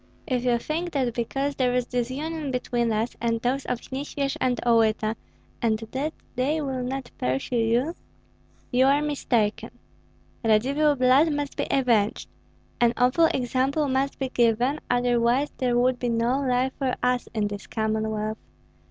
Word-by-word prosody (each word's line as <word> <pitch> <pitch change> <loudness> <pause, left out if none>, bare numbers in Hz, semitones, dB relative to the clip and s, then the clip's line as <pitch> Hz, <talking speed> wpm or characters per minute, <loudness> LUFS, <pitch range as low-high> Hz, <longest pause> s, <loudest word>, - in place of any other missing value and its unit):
If 250 -2 -1
you 240 -1 +3
think 330 +8 -3
that 255 -5 0
because 270 +4 -2
there 250 -2 +1
is 250 -1 +1
disunion 280 +6 -3
between 240 -2 -1
us 220 +2 -1
and 230 -1 0
those 255 +3 -1
of 245 - -2
Nyesvyej 275 0 -2
and 250 -1 +1
Olyta, 225 -2 +3 0.5
and 220 -2 +2
that 290 +4 -2 0.2
they 275 +5 +1
will 265 -3 -2
not 255 0 -4
pursue 135 - -1
you, 235 +7 +1 0.8
you 260 +1 +4
are 280 +1 +4
mistaken. 240 -7 0 0.7
Radzivill 275 +7 +3
blood 260 +5 +4
must 290 -1 -3
be - - -2
avenged, 235 -6 +1 0.5
an 235 -1 +4
awful 255 +7 +4
example 270 +1 0
must 270 +1 0
be 265 -1 -2
given, 240 +4 +2
otherwise 245 +2 +2
there 245 -2 +1
would 250 0 +2
be 245 - -1
no 235 +3 +1
life 255 0 +1
for 265 -3 0
us 250 0 +1
in 210 -1 +1
this 205 -1 -7
Commonwealth. 220 -1 -2
250 Hz, 150 wpm, -25 LUFS, 235-275 Hz, 0.8 s, you